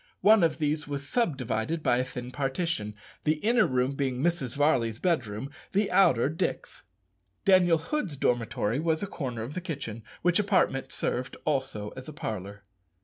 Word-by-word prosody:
One 215 0 +6
of 160 -2 +2
these 150 -1 -1
was 140 -1 -4
sub 170 - +1
divided 130 +6 -2
by 120 - +3
a - - +2
thin 125 -1 -7
partition, 135 -6 -2 0.3
the 155 +1 +3
inner 220 +8 +3
room 130 +1 +1
being 135 -2 -1
Mrs. 145 -5 0
Varley's 130 -7 +2
bedroom, 135 - -1 0.2
the 200 0 +2
outer 180 -11 +5
Dick's. 155 +3 -3 0.6
Daniel 180 -3 +5
Hood's 170 - -2
dormitory 120 -2 0
was 160 +2 0
a - - +1
corner 125 - -4
of 125 +6 -6
the 185 - -4
kitchen, 140 - -5 0.2
which 180 +2 +4
apartment 185 -9 +1
served 130 +1 -2
also 130 -8 -1
as 130 +5 -9
a - - -8
parlour. 100 -6 -5
140 Hz, 165 wpm, -28 LUFS, 125-170 Hz, 0.6 s, One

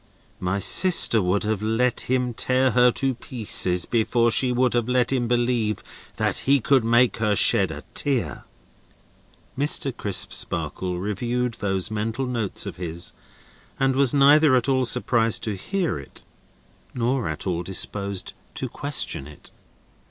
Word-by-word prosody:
My 90 +2 -2
sister 170 - +4
would 95 +2 0
have 105 -1 -2
let 115 +4 -1
him 125 -1 0
tear 130 +3 +1
her 125 0 +4
to 135 -1 0
pieces, 105 -7 -1
before 115 0 +1
she 125 +2 +2
would 125 0 +1
have 120 0 -1
let 125 +1 +1
him 120 -3 -1
believe 120 -3 -1 0.3
that - - -1
he 140 0 +5
could 130 +1 +2
make 120 0 +2
her 105 -2 0
shed - - +5
a - - -8
tear." 120 - -2 1.1
Mr. 140 -2 -1
Crisparkle 95 -2 -1
reviewed 120 +5 -2
those 95 0 -2
mental 110 +5 -3
notes 115 -6 -3
of - - -7
his, 85 -1 -5 0.7
and 135 0 +1
was 135 -2 +3
neither 145 0 +5
at 125 +1 0
all 130 -1 +1
surprised 115 -2 +1
to 105 -2 -2
hear 175 - -3
it, 70 - -14 0.7
nor 125 -3 -1
at 80 - -6
all 90 -3 -2
disposed 100 +1 -1 0.2
to - - -3
question 70 - 0
it. 75 - -15
120 Hz, 145 wpm, -23 LUFS, 100-130 Hz, 1.1 s, he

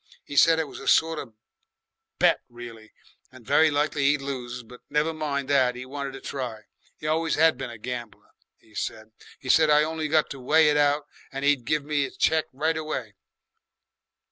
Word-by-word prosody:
'E 145 - -7
said 165 +3 +6
it 160 -2 -1
was - - -10
a 135 - -9
sort 160 -1 +3
of 115 -5 -9 0.8
bet - - +3
reely, 120 -2 -11 0.4
and 130 -3 -15
very 155 +3 +4
likely 145 -1 0
'e'd 145 +1 +3
lose; 125 -3 -5
but 125 +2 -14
never 150 +2 +1
mind 145 -3 -3
that, 130 -3 +2
'e 125 - -7
wanted 140 0 -5
to 135 - -8
try. 120 -6 -5 0.4
'E - - -5
always 160 +1 0
'ad 160 -2 +5
been 130 0 -6
a 115 - -9
gambler, 115 -3 -7 0.3
'e 110 - -24
said. 110 +1 -5 0.3
'E - - -10
said 155 +2 +5
I'd 150 0 +5
only 160 0 -2
got 155 0 +2
to 135 - -7
weigh 150 +4 +4
it 150 - +2
out 145 0 +2 0.3
and 135 +1 -4
'e'd 145 -4 +2
give 150 +2 0
me 150 -1 0
'is - - -10
cheque 160 -1 +2
right 160 +4 -1
away. 135 -9 -4
140 Hz, 195 wpm, -25 LUFS, 125-155 Hz, 0.8 s, said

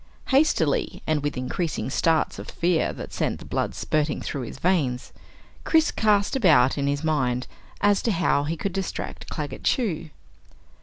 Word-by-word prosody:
Hastily, 315 - +2
and 155 -2 +1
with 145 -1 -2
increasing 135 +3 -2
starts 160 +2 +1
of - - -8
fear 170 -1 +1
that - - -8
sent - - -1
the - - -12
blood - - -2
spurting 155 -1 0
through 140 - -4
his 120 - -7
veins, 140 -7 0 0.5
Chris 320 -1 +3
cast 210 +1 +2
about 155 - +5
in 140 -1 -1
his 145 +2 -1
mind 130 -5 0 0.4
as 205 -1 +3
to 230 - 0
how 165 -6 +2
he 165 +3 -2
could 195 +3 -3
distract 195 0 -5
Claggett - - -5
Chew. 195 - 0
160 Hz, 160 wpm, -25 LUFS, 145-200 Hz, 0.5 s, about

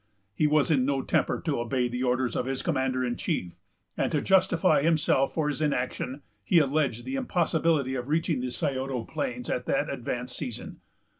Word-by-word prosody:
He 150 +9 +2
was 150 +1 +3
in 135 -4 +3
no 135 0 0
temper - - +1
to 150 -7 0
obey 125 +1 0
the 125 +1 -4
orders 125 -1 0
of 125 - -1
the 135 - -1
commander 130 -5 0
in 120 -1 -2
chief; 90 -1 -2 0.4
and, - - 0
to 155 - +2
justify 180 -3 +3
himself 150 -3 +2
for 155 -2 +1
his 150 +1 -2
inaction, 135 -1 -2 0.2
he 175 - +3
alleged 140 -5 +1
the 265 - -4
impossibility 165 - +1
of 125 -1 -3
reaching 155 -2 0
the 125 - -2
Scioto 130 -1 -2
plains 125 -3 -4
at 125 - -2
that - - 0
advanced 125 +1 -4
season. 125 -6 -6
135 Hz, 180 wpm, -27 LUFS, 125-155 Hz, 0.4 s, was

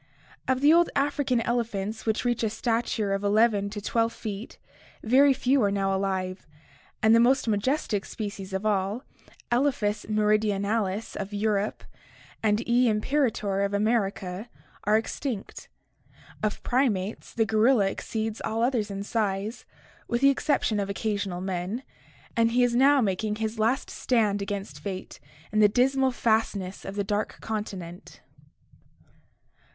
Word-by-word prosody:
Of 260 0 +1
the 295 +2 +6
old 345 +1 +5
African 275 -3 +1
elephants 225 -3 -2
which 220 +2 0
reach 240 -1 +1
a 220 - +1
stature 225 -2 -1
of 195 +1 -2
11 205 0 +3
to 205 +1 -5
12 230 +2 +1
feet, 210 0 -7 0.5
very 270 +5 +5
few 270 0 +2
are 205 - +3
now 195 -1 0
alive, 190 -2 -2 0.6
and 220 0 +6
the 230 - +6
most 255 +2 +3
majestic 215 -1 0
species 200 -3 -6
of 190 +2 -3
all, 205 +3 0 0.5
Elepkas 240 -5 +1
meridionalis 210 -1 0
of 200 +2 -5
Europe 205 0 -1 0.6
and 215 +1 +1
E, 240 0 +4
imperator 215 -3 0
of 200 0 0
America, 200 -1 -1 0.4
are 210 +1 +4
extinct. 225 0 -5 0.7
Of 215 -1 -2
primates, 225 -6 0
the 225 - +1
gorilla 220 +1 +3
exceeds 220 +2 -3
all 225 +1 -1
others 240 -4 +1
in 200 0 -4
size, 210 0 -2 0.4
with 240 +1 -1
the 275 0 +6
exception 275 -6 0
of 200 -1 -2
occasional 200 -3 -2
men, 190 +6 -3 0.5
and 230 0 +3
he 250 +1 +4
is 240 -1 +2
now 275 +2 +5
making 210 0 0
his 220 +1 -3
last 230 +5 +1
stand 215 -5 +1
against 200 0 -5
fate 190 -2 -6 0.3
in 215 - +1
the 210 -1 +6
dismal 265 +4 +3
fastness 220 -6 -1
of 195 - -6
the 205 - 0
dark 205 +2 -2
continent. 195 -5 -6
215 Hz, 140 wpm, -27 LUFS, 200-240 Hz, 0.7 s, the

